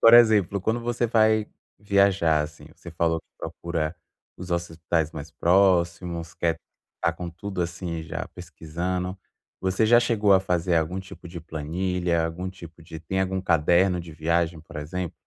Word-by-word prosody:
Por 115 +1 +8
exemplo, 105 -5 +6
quando 110 +5 0
você 120 0 0
vai 110 -1 +3 0.3
viajar, 100 -6 +3
assim, 75 0 -6
você 85 - -11
falou 80 0 0
que - - -47
procura 85 -2 -3 0.4
os 90 0 -8
hospitais 85 -2 -1
mais 80 0 -7
próximos, 85 0 +2
quer 85 -1 0 0.4
estar 85 - +1
com 85 -1 -5
tudo, 90 +1 -4
assim, 85 -1 -4
já 80 - -5
pesquisando, 90 +2 -4 0.4
você 95 +3 +1
já 120 +2 +7
chegou 110 -4 +3
a 95 - +6
fazer 90 -2 +1
algum 80 +4 0
tipo 95 -1 -11
de 85 -1 -7
planilha, 85 +2 -1
algum 90 +3 -3
tipo 85 -3 -12
de 80 0 -9
tem 95 +4 -2
algum 95 0 0
caderno 90 +2 +3
de 85 -2 -10
viagem, 85 +1 0
por 80 - -12
exemplo? 85 +3 -4
85 Hz, 160 wpm, -25 LUFS, 80-95 Hz, 0.4 s, Por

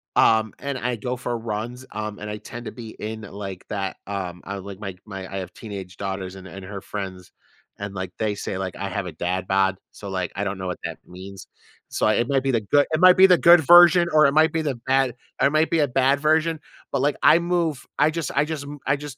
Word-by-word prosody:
Um, 110 -1 +4
and 140 -1 -3
I 125 0 -1
go 125 +3 -3
for 120 -1 -3
runs, 115 +3 -5
um, 105 0 -5
and 105 - -6
I 105 - -4
tend 120 +3 -9
to - - -5
be 115 0 -9
in 110 +1 -5
like 100 -3 -8
that, 100 -2 -3
um 90 -3 -5
I 100 - -5
like 100 0 -9
my 95 -3 -6
my 95 -3 -8
I 95 - -4
have 90 -1 -7
teenage 95 -4 -8
daughters 95 -1 -4
and 95 0 -11
and 95 0 -10
her 100 0 -7
friends, 95 -3 -7 0.5
and, 100 -1 -5
like, 95 -1 -4
they 110 -2 0
say, 95 - -4
like, 95 -1 -4
I 100 - -4
have 100 +1 -3
a - - -5
dad 90 +4 -3
bod, 95 0 +2 0.2
so, 100 - -9
like, 95 -2 -2
I 100 - -2
don't 100 -1 -3
know 95 - -4
what 90 - -3
that - - -5
means. 95 +1 -10 0.4
So, - - 0
it 120 +2 +2
might 135 -1 +2
be 135 - +1
the 115 -3 +1
good 145 +8 +3
it 155 - +2
might 185 0 +7
be 190 +1 +9
the 180 -2 +6
good 170 0 +7
version 175 +2 +7
or 155 0 +6
it 140 - +3
might 155 +1 +4
be 160 - 0
the 145 -4 -1
bad 130 -2 +2 0.3
or - - +6
it - - -1
might 155 +1 +2
be 165 - +1
a 145 - +3
bad 135 +2 +2
version, 160 +2 +2 0.3
but, 140 - 0
like, 145 +2 +2
I 160 - +7
move 170 -4 -1
I 150 - +5
just 165 -3 -3
I 140 +2 +3
just 155 -2 -4
m 145 +1 -8
I 140 - +3
just, 145 -1 -9
110 Hz, 255 wpm, -23 LUFS, 95-145 Hz, 0.5 s, be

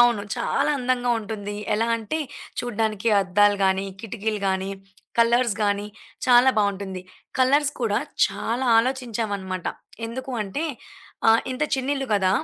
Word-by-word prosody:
అవును. 240 -4 +5
చాలా 240 +5 +1
అందంగా 245 -1 0
ఉంటుంది. 205 -1 -5 0.2
ఎలా 225 +2 +1
అంటే, 225 +7 -3 0.4
చూడడానికి 220 -2 -1
అద్దాలు 205 +2 +3
గానీ, 190 +1 +2 0.2
కిటికీలు 220 -1 -3
గానీ, 190 +1 -1 0.5
కలర్స్ 235 -1 +4
గానీ 205 0 0 0.4
చాలా 250 +1 +7
బావుంటుంది. 195 -2 -1 0.4
కలర్స్ 285 +3 +4
కూడా 215 -4 +1 0.3
చాలా 245 +3 -2
ఆలోచించామన్నమాట. 220 -7 -2 0.4
ఎందుకు 260 +3 -6
అంటే 205 +11 -3 0.6
ఆహ్, 225 +1 +6
ఇంత 255 +4 -3
చిన్న 265 0 -2
ఇల్లు 270 -1 -3
కదా 190 -2 +3
225 Hz, 125 wpm, -24 LUFS, 200-245 Hz, 0.6 s, చాలా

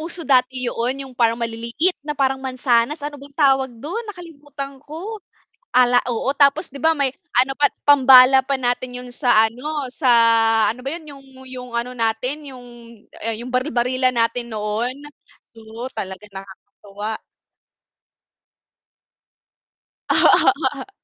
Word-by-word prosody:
uso 335 +2 -3
dati 255 -1 +2
'yoon, 250 +4 -2
'yong 260 -2 -13
parang 230 -1 +2
maliliit 235 +10 -1
na 300 - -3
parang 270 -1 +1
mansanas. 255 +2 0
Ano 290 0 -5
bang 280 0 -14
tawag 270 -3 +3
do'n? 405 +11 -5
Nakalimutan 290 -6 -9
ko. 365 +9 -7 0.6
Ala 245 -1 +5
oo, 240 +3 -1
tapos, 280 +4 +3
'di - - -7
ba 320 - +4
may 270 -2 +1 0.3
ano 270 +1 -3
pa, 290 - +4 0.2
pambala 265 -2 +7
pa 275 0 -1
natin 250 0 -2
'yon 250 0 -10
sa, 240 -4 +4
ano, 285 +5 -5
sa, 260 -5 +1 0.6
ano 250 - -13
ba 270 - -4
'yon 320 -3 -13
'yong 275 0 -15 0.3
'yong 250 -1 -8
ano 250 +1 -4
natin 250 +6 -2
'yong 250 -2 -12 0.6
ah, 225 0 -2
'yong 245 +1 -8
baril-barilan 255 -1 +1
natin 230 +1 -1
noon. 215 +4 -2 0.6
Oo, 225 +2 -9
talaga 190 -1 -6
nakakatuwa. 200 +2 -8 2.9
Oo. 395 - +3
255 Hz, 135 wpm, -20 LUFS, 235-280 Hz, 2.9 s, pambala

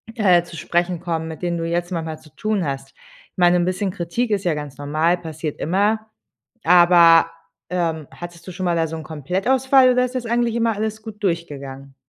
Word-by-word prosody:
äh, 185 -6 +4
zu 170 - -11
sprechen 175 0 -1
kommen, 165 -2 -3
mit 160 +2 -8
denen 175 -1 -1
du 165 - -2
jetzt 175 +1 -2
manchmal 160 -3 -4
zu 155 -3 -20
tun 215 -3 -1
hast. 135 -1 -5 0.4
Ich - - -58
meine 175 0 +4
'n 175 - +1
bisschen 185 +1 -1
Kritik 200 +6 -2
ist 200 -2 0
ja 165 -3 +1
ganz 145 -2 -7
normal, 155 +5 +1
passiert 160 -3 -6
immer, 205 +6 0 0.6
aber, 170 -1 +6 0.4
ähm, 165 -4 -1
hattest 175 0 -10
du 185 - -7
schon 185 +1 -5
mal 175 -1 +1
da 165 -1 +1
so 160 +1 -6
'n 160 - -7
Komplettausfall 250 - +2
oder 250 0 +2
ist 250 +1 -5
das 250 -2 -3
eigentlich 235 0 0
immer 230 -1 +1
alles 220 +1 -3
gut 210 -1 -10
durchgegangen? 140 -7 -4
175 Hz, 205 wpm, -21 LUFS, 160-205 Hz, 0.6 s, aber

